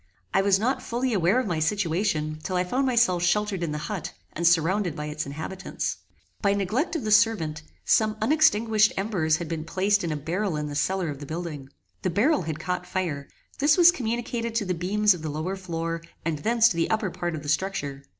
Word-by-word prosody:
I 195 Hz, -, +4 dB
was 195 Hz, -1 st, +4 dB
not 255 Hz, +5 st, 0 dB
fully 245 Hz, +1 st, -1 dB
aware 190 Hz, +4 st, +3 dB
of 255 Hz, -, -1 dB
my 175 Hz, -6 st, -1 dB
situation 160 Hz, -3 st, 0 dB
till 185 Hz, +2 st, -3 dB
I 180 Hz, -, +2 dB
found 255 Hz, +9 st, 0 dB
myself 235 Hz, -8 st, +3 dB
sheltered 200 Hz, +1 st, +1 dB
in 165 Hz, -3 st, -2 dB
the 150 Hz, -, -3 dB
HUT, 200 Hz, -6 st, -4 dB, 0.2 s
and 170 Hz, +1 st, +1 dB
surrounded 170 Hz, +1 st, +2 dB
by 150 Hz, -, -4 dB
its 150 Hz, 0 st, -4 dB
inhabitants. 160 Hz, +7 st, -4 dB, 0.4 s
By 200 Hz, -1 st, +2 dB
neglect 225 Hz, -, -1 dB
of 325 Hz, -, -2 dB
the 215 Hz, -, -2 dB
servant, 165 Hz, -9 st, +3 dB, 0.2 s
some 215 Hz, -1 st, +3 dB
unextinguished 220 Hz, -5 st, +3 dB
embers 185 Hz, -6 st, +1 dB
had 170 Hz, -1 st, -5 dB
been 160 Hz, -1 st, -3 dB
placed 195 Hz, +4 st, +1 dB
in 170 Hz, -, -2 dB
a -, -, -1 dB
barrel 175 Hz, +5 st, -2 dB
in 150 Hz, -, -2 dB
the 145 Hz, -, -5 dB
cellar 185 Hz, +3 st, 0 dB
of 140 Hz, -2 st, -6 dB
the 145 Hz, -, -8 dB
building. 155 Hz, -4 st, -5 dB, 0.3 s
The -, -, 0 dB
barrel 230 Hz, -, +2 dB
had 160 Hz, -2 st, -4 dB
caught 180 Hz, +2 st, -3 dB
fire; 155 Hz, -7 st, -3 dB, 0.3 s
this 295 Hz, +4 st, +4 dB
was 350 Hz, -1 st, +8 dB
communicated 235 Hz, -4 st, -3 dB
to 225 Hz, -3 st, 0 dB
the 185 Hz, -, -1 dB
beams 200 Hz, +4 st, +2 dB
of 175 Hz, -, -8 dB
the 155 Hz, -, -4 dB
lower 155 Hz, +6 st, -3 dB
floor, 165 Hz, -3 st, -4 dB, 0.2 s
and 160 Hz, -3 st, -1 dB
thence 230 Hz, +6 st, +4 dB
to 185 Hz, -, -3 dB
the 165 Hz, -, +1 dB
upper 215 Hz, -4 st, 0 dB
part 175 Hz, -2 st, -3 dB
of 150 Hz, -, -7 dB
the 145 Hz, -, -5 dB
structure. 150 Hz, -5 st, -2 dB
185 Hz, 215 wpm, -26 LUFS, 160-215 Hz, 0.4 s, was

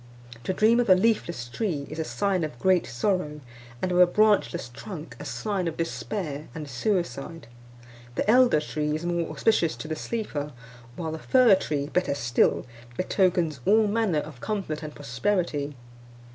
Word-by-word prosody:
To -, -, 0 dB
dream 220 Hz, +5 st, +4 dB
of 240 Hz, -, +1 dB
a 185 Hz, -, +9 dB
leafless 185 Hz, -, 0 dB
tree, 145 Hz, -, -2 dB
is 155 Hz, -, -7 dB
a -, -, +1 dB
sign 190 Hz, +1 st, 0 dB
of 150 Hz, -6 st, -4 dB
great 185 Hz, +5 st, +2 dB
sorrow; 150 Hz, +2 st, -1 dB, 0.4 s
and 185 Hz, -, 0 dB
of 180 Hz, -, +2 dB
a 180 Hz, -, +8 dB
branchless 205 Hz, -, +2 dB
trunk, 165 Hz, -, -8 dB
a -, -, -7 dB
sign 200 Hz, -5 st, -2 dB
of 165 Hz, -, -4 dB
despair 165 Hz, -3 st, -3 dB
and 155 Hz, -2 st, -6 dB
suicide. 165 Hz, -, -2 dB, 0.7 s
The -, -, -1 dB
elder 245 Hz, -6 st, +5 dB
tree 150 Hz, 0 st, -2 dB
is 160 Hz, +2 st, -4 dB
more 170 Hz, -1 st, -1 dB
auspicious 160 Hz, +2 st, +2 dB
to -, -, -7 dB
the 155 Hz, -, -2 dB
sleeper; 155 Hz, -10 st, -4 dB, 0.4 s
while 160 Hz, -2 st, -4 dB
the 160 Hz, -, -5 dB
fir 250 Hz, +3 st, +5 dB
tree, 150 Hz, -6 st, 0 dB
better 155 Hz, -1 st, 0 dB
still, 120 Hz, -3 st, +2 dB, 0.3 s
betokens 180 Hz, -6 st, +1 dB
all 215 Hz, -, +5 dB
manner 205 Hz, -7 st, +1 dB
of 150 Hz, -5 st, -11 dB
comfort 195 Hz, -8 st, -3 dB
and 150 Hz, -1 st, -7 dB
prosperity. 145 Hz, -, -1 dB
170 Hz, 165 wpm, -26 LUFS, 150-200 Hz, 0.7 s, a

